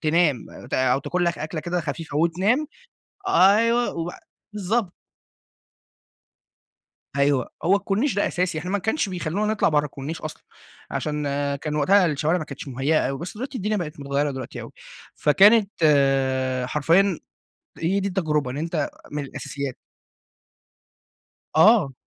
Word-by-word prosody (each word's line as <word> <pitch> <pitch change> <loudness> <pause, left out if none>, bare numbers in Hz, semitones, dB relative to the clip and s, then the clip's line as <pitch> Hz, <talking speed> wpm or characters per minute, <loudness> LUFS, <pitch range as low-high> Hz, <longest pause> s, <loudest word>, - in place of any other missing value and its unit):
تنام 155 -5 +2 0.2
ت - - -1
أو 130 0 +2
تاكل 180 +6 -1
لك 170 0 0
أكلة 155 +1 -4
كده 175 +2 -2
خفيفة 160 -1 -5
وتنام، 185 - +2 0.6
أيوه، 230 - +4
وبع 170 +1 -5 0.3
بالضبط. 205 -1 -1 2.3
أيوه، 140 -2 +2
هو 185 +4 +4
الكورنيش 205 +7 0
ده 205 - +2
أساسي، 180 -2 -1
إحنا 180 +4 -5
ما 205 - +2
كانش 220 +4 -1
بيخلونا 185 +4 -1
نطلع 215 - +2
برّه 150 -1 +2
الكورنيش 145 +2 -6
أصلًا، 155 - -7 0.5
عشان 150 -1 -2 0.3
كان 150 +2 -4
وقتها 185 +6 +4
الشوارع 155 +2 +1
ما 165 - -3
كانتش 140 -1 -8
مهيأة 135 +4 +1
أوي، 135 - -3
بس 175 +5 -6
دلوقتي 260 +2 -5
الدنيا 210 +1 -1
بقت 155 -6 -5
متغيرة 140 +1 -1
دلوقتي 130 -3 -7
أوي. - - -9 0.4
فكانت 200 +7 +5 1.0
حرفيًا 165 +7 +2 0.6
هي 185 +5 0
دي 200 - -1
التجربة 155 -8 -1
إن 135 - -5
أنتَ 160 -1 -2 0.2
من 150 -1 -3
الأساسيات 140 -1 -5 1.8
آه. 170 - +5
165 Hz, 135 wpm, -24 LUFS, 150-195 Hz, 2.3 s, فكانت